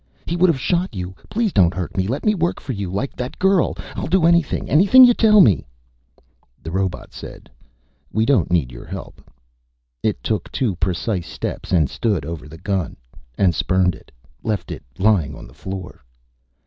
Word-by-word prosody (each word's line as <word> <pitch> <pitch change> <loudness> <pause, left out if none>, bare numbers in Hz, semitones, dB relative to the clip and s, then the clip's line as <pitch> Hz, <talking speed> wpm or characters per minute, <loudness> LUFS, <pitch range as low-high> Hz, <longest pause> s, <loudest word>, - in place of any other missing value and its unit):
"He 170 - -2
would 180 +1 +4
have 160 -6 +1
shot 175 - -1
you 90 0 -5 0.2
please 225 -3 0
don't 90 -3 +4
hurt 90 -4 -4
me! 95 -1 0
Let 130 +6 -3
me 210 - +4
work 175 -3 -1
for - - -6
you, 100 -4 -4
like 115 +8 -3
that 125 0 -5
girl. 190 -2 +2 0.2
I'll - - -3
do 175 +1 +3
anything, 170 -3 +2
anything 200 - +7
you 245 - +6
tell 215 -3 +6
me 85 - +4 0.4
" - - -37
The 80 - -6
robot 95 0 -2
voice - - -10
said. - - -11 0.6
"We 110 0 +1
don't 140 +1 +2
need 80 -8 +1
your - - -10
help." - - -8 0.8
It 110 - -1
took 105 -6 -2
two 120 -9 -1
precise 90 0 -2
steps - - -5
and 80 -5 +3
stood 100 - -1
over 80 -1 -6
the 80 +2 -11
gun 95 0 -2 0.4
and 95 -3 +3
spurned 90 +2 +1
it, - - -16 0.3
left 105 -5 -3
it - - -6 0.2
lying 95 -8 +2
on - - -10
the - - -16
floor. 95 -2 -8
100 Hz, 190 wpm, -21 LUFS, -, 0.8 s, anything